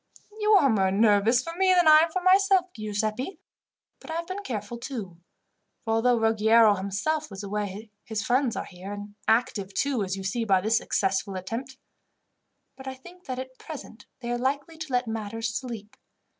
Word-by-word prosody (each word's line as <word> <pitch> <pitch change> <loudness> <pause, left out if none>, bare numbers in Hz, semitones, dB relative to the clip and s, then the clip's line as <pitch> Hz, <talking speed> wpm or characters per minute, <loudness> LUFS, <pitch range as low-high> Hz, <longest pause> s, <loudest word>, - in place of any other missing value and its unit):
"You 425 0 +3
are 380 -9 +6
more 195 -6 +2
nervous 215 +4 +4
for 330 - -6
me 375 0 +4
than 350 -2 +4
I 310 0 +9
am 325 +1 +2
for 370 +2 -2
myself, 375 -1 +4
Giuseppi; 215 - -3 0.6
but - - -14
I 320 - -3
have 335 +1 -2
been 375 +3 -5
careful 235 - -5
too, 220 -9 -6 0.7
for 225 - -1
although 240 +2 +3
Ruggiero 225 0 +5
himself 200 +11 -2
was 195 0 -8
away 205 +1 -4
his 220 -2 -3
friends 255 -1 +1
are - - -3
here, 190 +2 -8
and 205 0 -8
active, 205 -4 +1
too, 275 -5 0
as 190 0 -3
you 195 - -6
see 215 +5 -1
by 195 -4 +3
this 220 +4 +2
successful 195 -2 -1
attempt. 230 +8 -5 1.0
But 265 0 -11
I 265 - -4
think 355 +7 -15
that 255 -2 -4
at 260 0 -8
present 285 -7 -10
they 240 -1 -4
are 240 - -1
likely 285 +5 -2
to 310 -3 -6
let 250 0 +1
matters 225 0 -3
sleep. 225 -4 -6
230 Hz, 185 wpm, -26 LUFS, 205-280 Hz, 1.0 s, I